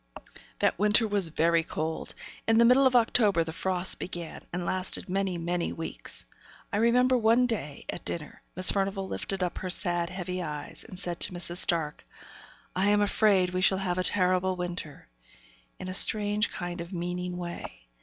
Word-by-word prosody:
That - - +1
winter 210 +2 +5
was 200 -4 +1
very 165 +1 +2
cold. 160 0 -4 0.3
In 225 0 +4
the 235 - +6
middle 260 +3 +6
of 255 - 0
October 220 -6 +4
the 160 0 -6
frosts 185 +1 +1
began, 175 -2 -6
and 175 0 -3
lasted 185 +1 -2
many, 190 -1 -1
many 170 +1 -2
weeks. 165 - -6 0.5
I - - +1
remember 250 +3 +4
one 235 +1 +4
day, 200 - -4
at - - -6
dinner, 155 -3 -5
Miss 185 0 +6
Furnivall 195 -1 -1
lifted 195 0 -3
up 180 - -3
her 185 - -4
sad, 175 -2 +1
heavy 180 0 -4
eyes, 150 -3 -6
and 185 - -11
said 175 -2 -3
to - - -1
Mrs. 175 0 -3
Stark, 160 -4 +2 0.7
'I 190 +2 +2
am 205 0 +4
afraid 200 -3 +3
we 185 0 -1
shall 190 +1 +4
have 185 -2 -2
a - - +1
terrible 185 -1 +2
winter,' 175 -4 -6 0.7
in 185 - -7
a 185 - -4
strange 210 +2 +2
kind 175 -1 -5
of 170 +2 -8
meaning 180 0 -4
way. 170 - -7
185 Hz, 175 wpm, -28 LUFS, 175-205 Hz, 0.7 s, the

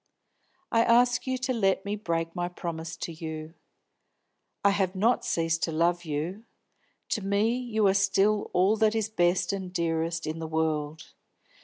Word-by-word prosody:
"I 230 - +4
ask 245 +2 +3
you 260 0 0
to 255 0 -1
let 195 -4 +1
me 205 +1 -2
break 165 -4 -2
my 175 -1 -2
promise 170 -1 -6
to 170 - -5
you. 160 -1 -7 1.1
I 200 - +6
have 195 -1 0
not 225 +6 +2
ceased 165 0 0
to 165 - -4
love 170 +2 +1
you; 160 +8 -3 0.7
to 215 - -1
me 200 +4 +1
you 235 -4 0
are 190 - +5
still 200 +1 +2
all 190 +4 +3
that 220 0 +3
is 220 -1 0
best 180 -2 +1
and 190 -2 -4
dearest 165 -1 -1
in 155 +1 -4
the 160 - -4
world. 155 -1 -2
180 Hz, 165 wpm, -27 LUFS, 165-210 Hz, 1.1 s, I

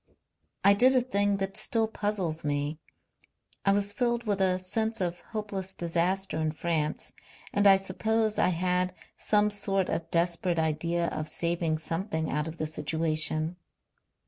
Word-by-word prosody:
I 200 - +7
did 255 +6 +5
a 255 - +5
thing 205 -4 +1
that 195 0 -3
still 225 -2 +1
puzzles 200 -7 -2
me. 145 +1 -1 0.8
I 195 - +4
was 205 0 +1
filled 240 +1 0
with 205 -3 -1
a 185 -1 +3
sense 220 +5 -2
of 175 -2 -2
hopeless 200 -4 -5
disaster 175 +1 0
in 155 -1 0
France 155 -2 -1 0.4
and 205 0 +4
I 195 -1 +8
suppose 215 +3 0
I - - +4
had 180 +1 0 0.2
some 210 0 +2
sort 195 -2 0
of 165 0 -2
desperate 170 +1 +1
idea 165 +2 0
of 155 - -4
saving 170 -1 -1
something 160 0 -2
out 150 +2 -1
of 160 +1 -7
the 155 - -2
situation.... 155 +1 0
185 Hz, 150 wpm, -28 LUFS, 165-205 Hz, 0.8 s, I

